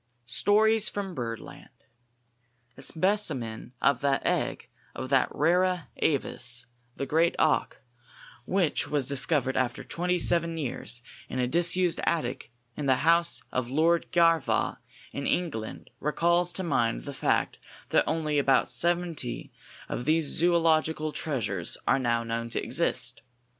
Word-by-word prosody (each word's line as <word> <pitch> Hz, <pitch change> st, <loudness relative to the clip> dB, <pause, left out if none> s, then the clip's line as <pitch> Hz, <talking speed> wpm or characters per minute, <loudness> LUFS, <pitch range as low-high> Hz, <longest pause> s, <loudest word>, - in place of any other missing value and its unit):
_ -, -, -47 dB, 0.2 s
STORIES 215 Hz, -, +3 dB
FROM 195 Hz, -2 st, -4 dB
BIRDLAND. 115 Hz, -5 st, -6 dB, 1.1 s
A -, -, -12 dB
specimen 135 Hz, -, -1 dB
of 140 Hz, -3 st, +3 dB
the 140 Hz, -1 st, +2 dB
egg -, -, -1 dB, 0.3 s
of 130 Hz, +1 st, -6 dB
that 135 Hz, -2 st, +3 dB
rara 180 Hz, +3 st, +1 dB
avis, 125 Hz, -4 st, 0 dB, 0.3 s
the 140 Hz, -, -3 dB
great 165 Hz, +5 st, +2 dB
auk, 155 Hz, -, +1 dB, 0.7 s
which 185 Hz, -5 st, +1 dB
was 145 Hz, -4 st, -1 dB
discovered 140 Hz, -1 st, +1 dB
after 125 Hz, -2 st, -1 dB
twenty 180 Hz, +1 st, -1 dB
seven 170 Hz, -1 st, +1 dB
years 120 Hz, -4 st, -4 dB, 0.3 s
in -, -, -4 dB
a 125 Hz, -1 st, +1 dB
disused 175 Hz, +4 st, +2 dB
attic 130 Hz, -7 st, -1 dB, 0.2 s
in 145 Hz, -, -3 dB
the 130 Hz, -, +5 dB
house 170 Hz, +1 st, +3 dB
of 130 Hz, -1 st, -2 dB
Lord 165 Hz, +5 st, +2 dB
Garvagh 165 Hz, -2 st, +2 dB, 0.3 s
in 140 Hz, -, -4 dB
England, 145 Hz, -12 st, -3 dB
recalls 170 Hz, +4 st, +1 dB
to 190 Hz, -, -3 dB
mind 115 Hz, -, 0 dB
the -, -, -6 dB
fact -, -, 0 dB, 0.3 s
that -, -, +4 dB
only 155 Hz, -2 st, 0 dB
about 135 Hz, -1 st, +3 dB
seventy 170 Hz, -8 st, -1 dB, 0.4 s
of 120 Hz, -, -4 dB
these 155 Hz, 0 st, +1 dB
zoölogical 160 Hz, -2 st, +2 dB
treasures 105 Hz, -, -3 dB
are -, -, +4 dB
now 120 Hz, -2 st, +1 dB
known 115 Hz, 0 st, -3 dB
to -, -, -1 dB
exist. -, -, -1 dB
155 Hz, 135 wpm, -28 LUFS, 125-170 Hz, 1.1 s, the